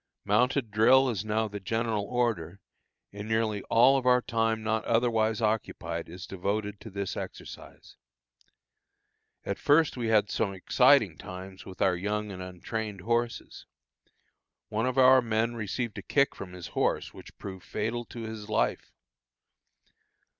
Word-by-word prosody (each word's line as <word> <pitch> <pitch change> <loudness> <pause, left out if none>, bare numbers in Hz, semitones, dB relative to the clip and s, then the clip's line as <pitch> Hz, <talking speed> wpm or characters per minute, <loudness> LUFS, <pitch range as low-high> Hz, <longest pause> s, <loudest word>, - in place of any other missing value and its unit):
Mounted 125 +3 +2
drill 130 +5 +5
is 105 -4 -3
now 110 +1 0
the 105 -1 -6
general 110 +1 -1
order, 105 -8 -1 0.5
and 100 +1 -7
nearly 110 -2 0
all 130 +4 +5
our 125 0 +5
time 115 -2 -1
not 110 0 0
otherwise 115 -1 +1
occupied 85 -7 -2
is 90 +2 -8
devoted 100 +2 -3
to 110 - -10
this 100 -1 -4
exercise. - - -9 1.5
At - - -3
first 150 -1 +3
we 120 -2 -2
had 110 -2 +3
some 100 -3 -1
exciting 95 - +4
times 95 +1 -9
with 95 - -3
our 95 -2 +3
young 105 +3 -2
and 95 -1 -7
untrained 95 +3 -5
horses. 115 +3 -2 1.0
One 110 +3 0
of 130 0 -2
our 130 0 +7
men 115 0 0
received 115 +1 -4
a - - -6
kick 140 -1 +2
from 90 -2 -9
his 90 -3 -8
horse - - -1
which - - -13
proved 95 -2 -8
fatal 115 +3 -3
to 115 - -9
his 110 -2 -7
life. - - 0
110 Hz, 145 wpm, -28 LUFS, 100-115 Hz, 1.5 s, our